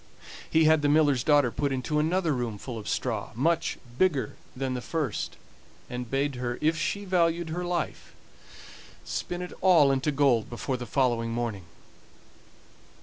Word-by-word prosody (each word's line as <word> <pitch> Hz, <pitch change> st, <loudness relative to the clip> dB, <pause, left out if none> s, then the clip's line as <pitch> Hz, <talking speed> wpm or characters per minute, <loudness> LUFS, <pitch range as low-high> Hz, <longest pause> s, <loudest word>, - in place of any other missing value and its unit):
He 160 Hz, -, +4 dB
had 155 Hz, -1 st, +5 dB
the 145 Hz, -, +2 dB
miller's 145 Hz, -4 st, +4 dB
daughter 145 Hz, -5 st, +4 dB
put 140 Hz, +2 st, -1 dB
into 135 Hz, +3 st, -1 dB
another 165 Hz, +1 st, +1 dB
room 120 Hz, -5 st, -2 dB
full 115 Hz, +2 st, -6 dB
of 105 Hz, -, -6 dB
straw, 110 Hz, -5 st, -2 dB
much 165 Hz, +7 st, +1 dB, 0.2 s
bigger 175 Hz, -8 st, +1 dB, 0.2 s
than 130 Hz, 0 st, -2 dB
the 125 Hz, -, -3 dB
first, 150 Hz, -5 st, -3 dB, 0.5 s
and 125 Hz, -1 st, -5 dB
bade 140 Hz, +1 st, 0 dB
her, 120 Hz, -1 st, -3 dB
if 160 Hz, +2 st, +2 dB
she 200 Hz, +6 st, -2 dB
valued 170 Hz, -2 st, +1 dB
her 175 Hz, +3 st, -3 dB
life, 175 Hz, -2 st, -3 dB, 0.9 s
spin 175 Hz, 0 st, -3 dB
it 180 Hz, -, -7 dB
all 170 Hz, -7 st, +6 dB
into 135 Hz, +2 st, +1 dB
gold 135 Hz, -6 st, +2 dB
before 125 Hz, +2 st, -3 dB
the 120 Hz, -1 st, -7 dB
following 120 Hz, -4 st, +1 dB
morning. 115 Hz, -5 st, -3 dB
140 Hz, 155 wpm, -27 LUFS, 125-160 Hz, 0.9 s, all